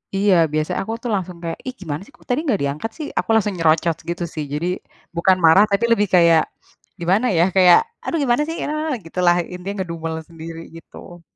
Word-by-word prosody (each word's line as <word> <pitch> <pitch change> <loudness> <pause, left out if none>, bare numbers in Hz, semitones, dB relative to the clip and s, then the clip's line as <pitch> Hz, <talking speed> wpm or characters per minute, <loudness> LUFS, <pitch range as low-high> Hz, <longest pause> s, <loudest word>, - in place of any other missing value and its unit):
Iya, 200 0 +3 0.2
biasanya 155 0 -1
aku 220 - -4
tuh 240 - -2
langsung 180 -2 -4
kayak, 165 -1 -4
"Ih, 255 - -3
gimana 155 -5 -4
sih - - -19
kok - - -23
tadi 250 +4 +1
gak 210 - +2
diangkat 145 +10 -2
sih?" 305 - -5
aku - - -1
langsung 210 -2 +2
nyerocot 165 0 +2
gitu 175 0 -3
sih. 155 - -3
Jadi, 155 +4 -2 0.5
bukan 185 +2 +3
marah 165 +5 +7
tapi 200 +4 +2
lebih 210 -3 +3
kayak 170 -2 +5 0.6
gimana 185 +8 +1
ya, 165 - +5
kayak, 180 -2 +7 0.3
"Aduh 335 - -2
gimana 245 +1 +2
sih? 330 - -4
Eee," 305 +1 -2
gitulah. 175 +1 +2 0.2
Intinya 180 +3 -6
ngedumel 165 -1 -5
sendiri 165 0 -9
gitu. 175 +1 -13
175 Hz, 195 wpm, -20 LUFS, 165-210 Hz, 0.6 s, marah